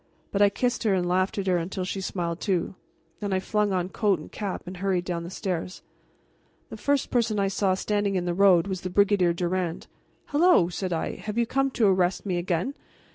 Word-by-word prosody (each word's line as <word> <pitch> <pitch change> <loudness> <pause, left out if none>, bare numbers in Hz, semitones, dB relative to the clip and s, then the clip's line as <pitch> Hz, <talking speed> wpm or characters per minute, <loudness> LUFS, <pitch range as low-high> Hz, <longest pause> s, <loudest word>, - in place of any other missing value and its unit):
But 200 - 0
I 205 - +7
kissed 245 +4 -1
her 210 -4 +2
and 180 -1 0
laughed 185 +3 +1
at 200 - -1
her 185 -2 +2
until 180 +2 -3
she 190 +1 -3
smiled 175 -3 -3
too. 185 -3 0 0.5
Then 205 -1 -3
I 190 - +2
flung 210 +1 0
on 180 -1 -1
coat 205 -2 +1
and 155 - -11
cap 200 -3 -4
and 180 +1 -7
hurried 185 -1 0
down 170 -2 -3
the 170 - -7
stairs. 185 -2 -4 0.9
The - - -5
first 285 -1 0
person 230 -4 +1
I 195 -1 +2
saw 195 -1 +1
standing 205 0 -1
in 180 -1 0
the 175 - 0
road 185 -2 +5
was 190 -2 -4
the 185 - -4
Brigadier 200 -2 +3
Durand. 175 0 -2 0.4
"Hello!" 300 - +4
said 185 +1 -4
I, 165 - -2
"have 210 +1 -6
you 235 - +3
come 270 +3 +1
to 230 - +4
arrest 185 -1 +2
me 185 -3 -1
again? 175 +8 -1
190 Hz, 215 wpm, -26 LUFS, 180-205 Hz, 0.9 s, I